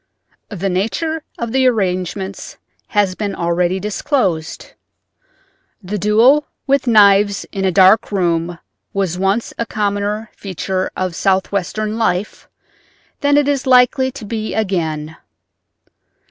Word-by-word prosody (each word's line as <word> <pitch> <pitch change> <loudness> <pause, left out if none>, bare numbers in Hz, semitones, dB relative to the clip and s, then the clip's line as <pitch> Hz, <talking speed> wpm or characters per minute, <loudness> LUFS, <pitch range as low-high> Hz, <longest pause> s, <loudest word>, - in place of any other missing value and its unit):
The 195 -2 -3
nature 225 - -1 0.2
of 235 -1 -4
the 260 +1 +3
arrangements 190 -3 -2 0.3
has 205 -3 +1
been 200 +1 -4
already 175 +2 0
disclosed. 200 - -2 1.1
The 200 +3 -4
duel 235 +9 +4 0.2
with 275 -1 +1
knives 205 -2 +4
in 195 -1 -2
a 190 - +2
dark 190 +4 +5
room 175 -3 0 0.4
was 185 -3 -1
once 195 +4 0
a 235 - 0
commoner 205 +1 -2
feature 190 0 -3
of 185 -2 -2
Southwestern 200 +3 -1
life 200 -2 -1 0.7
than 285 0 +3
it 290 -1 +3
is 280 -2 0
likely 260 +1 +4
to 260 -6 -8
be 220 0 -4
again. 160 -7 -2
200 Hz, 120 wpm, -17 LUFS, 185-225 Hz, 1.1 s, dark